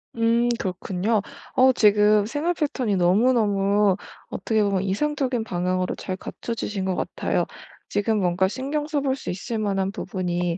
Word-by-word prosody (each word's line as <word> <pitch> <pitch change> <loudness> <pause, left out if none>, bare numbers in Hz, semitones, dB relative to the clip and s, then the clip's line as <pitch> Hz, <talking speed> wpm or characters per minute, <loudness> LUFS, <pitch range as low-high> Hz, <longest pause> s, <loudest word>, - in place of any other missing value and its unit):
음 230 +1 +2
그렇군요. 190 +3 -1 0.3
어 260 +1 +6
지금 210 -2 +4
생활 295 +9 -1
패턴이 260 - -1
너무너무 200 0 +3 0.3
어떻게 215 +3 0
보면 195 -2 +1
이상적인 255 +3 0
방향으로 185 -1 -1
잘 185 - -4
갖춰지신 210 -1 -4
것 185 -1 0
같아요. - - -1 0.4
지금 210 +1 +1
뭔가 180 0 +2
신경 280 +7 -3
써 300 -2 -1
볼 270 -1 0
수 - - -7
있을 215 +5 -3
만한 195 -2 0
부분이 180 -4 -2
210 Hz, 310 characters per minute, -24 LUFS, 190-240 Hz, 0.4 s, 어